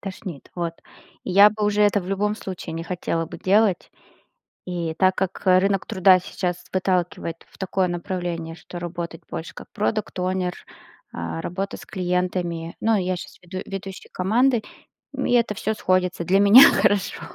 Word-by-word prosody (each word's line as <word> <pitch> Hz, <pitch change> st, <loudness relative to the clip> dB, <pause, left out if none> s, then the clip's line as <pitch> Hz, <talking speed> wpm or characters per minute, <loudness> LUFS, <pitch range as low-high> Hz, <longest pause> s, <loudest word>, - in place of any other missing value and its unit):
Тошнит, 185 Hz, -5 st, -8 dB
вот. 170 Hz, -2 st, -2 dB, 0.5 s
Я 200 Hz, +3 st, +7 dB
бы 215 Hz, 0 st, -3 dB
уже 210 Hz, 0 st, +2 dB
это 205 Hz, 0 st, +3 dB
в 180 Hz, -, -9 dB
любом 205 Hz, +2 st, 0 dB
случае 185 Hz, -5 st, -7 dB
не 165 Hz, -, -4 dB
хотела 170 Hz, -2 st, -2 dB
бы -, -, -9 dB
делать. 200 Hz, -1 st, +2 dB, 0.8 s
И 170 Hz, -3 st, -3 dB
так 185 Hz, +2 st, +3 dB
как, 190 Hz, 0 st, -3 dB
э, 185 Hz, 0 st, +6 dB
рынок 195 Hz, 0 st, +1 dB
труда 185 Hz, -3 st, +5 dB
сейчас 180 Hz, -1 st, -4 dB
выталкивает 180 Hz, -3 st, -1 dB
в -, -, -21 dB
такое 190 Hz, -1 st, 0 dB
направление, 175 Hz, -2 st, -4 dB
что 175 Hz, +1 st, -10 dB
работать 170 Hz, -1 st, -6 dB
больше 160 Hz, -, -6 dB
как -, -, -10 dB
product 215 Hz, 0 st, 0 dB
owner, 185 Hz, 0 st, -1 dB, 0.6 s
а, 85 Hz, -1 st, -4 dB
работа 195 Hz, +3 st, -4 dB
с -, -, -13 dB
клиентами. 180 Hz, -3 st, -2 dB
Ну, 225 Hz, 0 st, +3 dB
я 185 Hz, -1 st, -1 dB
щас -, -, -10 dB
веду 185 Hz, +1 st, -7 dB
ведущий 195 Hz, -1 st, -7 dB
команды, 230 Hz, +5 st, +2 dB, 0.5 s
и 265 Hz, -, -1 dB
это 235 Hz, -3 st, +2 dB
всё 215 Hz, +2 st, -2 dB
сходится. 185 Hz, -3 st, 0 dB
Для 195 Hz, +4 st, +3 dB
меня 210 Hz, +7 st, +10 dB
хорошо, 205 Hz, -1 st, +1 dB
185 Hz, 165 wpm, -23 LUFS, 175-200 Hz, 0.8 s, меня